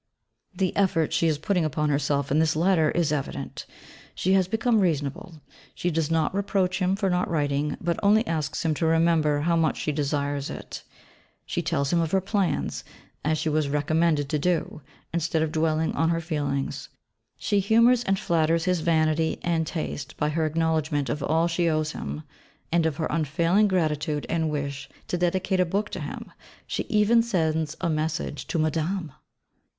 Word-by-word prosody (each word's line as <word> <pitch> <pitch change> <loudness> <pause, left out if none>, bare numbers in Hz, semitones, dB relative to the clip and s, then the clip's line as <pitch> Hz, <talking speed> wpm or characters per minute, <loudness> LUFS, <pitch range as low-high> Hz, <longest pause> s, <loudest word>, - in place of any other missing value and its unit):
The 190 -2 -1
effort 175 -6 +1
she 165 - +2
is 155 -2 +1
putting 180 +3 0
upon 150 0 0
herself 140 -1 0
in 150 - +3
this 160 -1 +2
Letter 165 -1 +3
is 165 -2 +1
evident. 145 -3 -4 0.5
She 190 - +1
has 190 -2 +3
become 225 +2 +2
reasonable; 160 -1 -2 0.3
she 175 - -1
does 160 -1 0
not 160 0 +1
reproach 195 -2 0
him 185 +1 +1
for 200 -1 -1
not 180 -1 0
writing, 145 -2 0
but 170 0 -1
only 215 +3 +4
asks 160 -1 -2
him 160 - +2
to 160 +2 0
remember 160 -2 +3
how 170 +2 +2
much 165 -1 +1
she 150 - -1
desires 145 -1 -1
it. - - -7 0.6
She - - -2
tells 140 +3 -1
him 170 - +3
of 165 - -1
her 190 - +5
plans, 190 - -1 0.4
as 155 +1 +1
she 160 - -2
was 155 -2 +1
recommended 150 +1 +1
to 150 - 0
do, 165 -1 -1 0.3
instead 165 -1 0
of 160 - -2
dwelling 160 0 +1
on 165 - +1
her 165 0 +1
feelings. 140 -4 -3 0.5
She 205 -2 +1
humours 230 +5 +4
and 195 -3 +1
flatters 165 -4 +1
his 180 -2 +1
vanity 160 -1 +1
and 165 -2 0
taste 145 -5 -5
by 150 - 0
her 155 +1 0
acknowledgment 155 -3 0
of 145 +5 -2
all 160 +3 +2
she 170 0 +1
owes 155 -1 0
him; 75 - -6 0.5
and 165 -1 +3
of 150 -3 -3
her 160 - -1
unfailing 165 +6 +2
gratitude 155 -5 0
and 160 -2 0
wish 140 -2 -4 0.2
to 180 - 0
dedicate 185 +2 0
a - - +5
book 200 +5 -2
to - - -4
him - - -7 0.3
she - - -3
even 215 +2 +4
sends 160 -8 -1
a 180 - 0
message 155 -1 -2
to - - -2
Madame! 160 +2 -1
160 Hz, 180 wpm, -25 LUFS, 150-180 Hz, 0.6 s, her